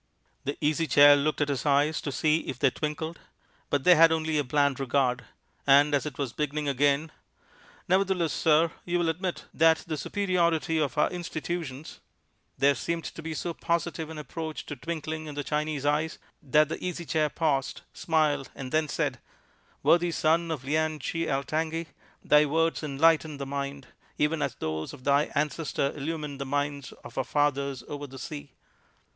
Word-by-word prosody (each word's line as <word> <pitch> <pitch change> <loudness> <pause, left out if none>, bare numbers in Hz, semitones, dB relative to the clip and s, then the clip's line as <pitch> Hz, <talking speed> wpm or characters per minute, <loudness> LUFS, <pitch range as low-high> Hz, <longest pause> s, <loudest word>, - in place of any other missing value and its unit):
The 140 +1 -2
Easy 155 +2 +1
Chair 145 +1 +8
looked 150 +2 0
at 145 - +1
his 140 -2 -1
eyes 145 +1 +2
to 145 - -3
see 155 +3 +2
if 130 - -4
they 135 -1 +3
twinkled, 160 +3 -4 0.5
but 145 -2 0
they 180 - +8
had 165 0 +7
only 160 -1 0
a - - +1
bland 140 +1 +1
regard; 130 -1 0 0.4
and 145 +2 +6
as 145 +1 +1
it 150 - -7
was 135 -5 -3
beginning 150 0 -2
again 140 +3 +2 0.8
"Nevertheless, 185 -3 +2
sir, 160 +1 +3
you 175 0 -1
will 170 -1 +1
admit 180 +2 -3
that 160 0 +4
the 155 -2 -3
superiority 170 -3 0
of 140 -5 -1
our 150 - +3
institutions" 165 -4 -5 0.6
there 140 +2 +4
seemed 165 +3 -3
to - - -7
be 160 0 -5
so 170 +2 -3
positive 170 -1 -2
an 160 - -8
approach 155 +2 -6
to 145 - -6
twinkling 155 +1 -5
in 150 - -7
the 145 - -3
Chinese 150 -1 -2
eyes 150 +2 +1 0.2
that 150 +1 +3
the - - -5
Easy 175 -1 -4
Chair 155 -1 +1
paused, 140 -4 -1
smiled, 150 -4 +1
and 130 -2 -7
then 155 0 +2
said: 150 - -2 0.6
"Worthy 175 0 +4
son 165 +1 +1
of 155 -5 -3
Lien 155 +3 0
Chi 165 +4 -3
Altangi, 160 +4 -1 0.4
thy 150 0 +5
words 165 +3 +1
enlighten 155 +1 +2
the 140 - -4
mind, 140 0 -4 0.3
even 150 +1 +1
as 130 -2 -1
those 80 0 -4
of 135 -3 -12
thy 140 +2 +3
ancestor 150 -1 -1
illuminated 150 -1 -4
the 140 - -3
minds 145 0 -2
of - - -6
our - - +1
fathers 140 -3 0
over 145 0 -6
the 135 0 -11
sea. 145 -1 -7
150 Hz, 175 wpm, -27 LUFS, 140-160 Hz, 0.8 s, Chair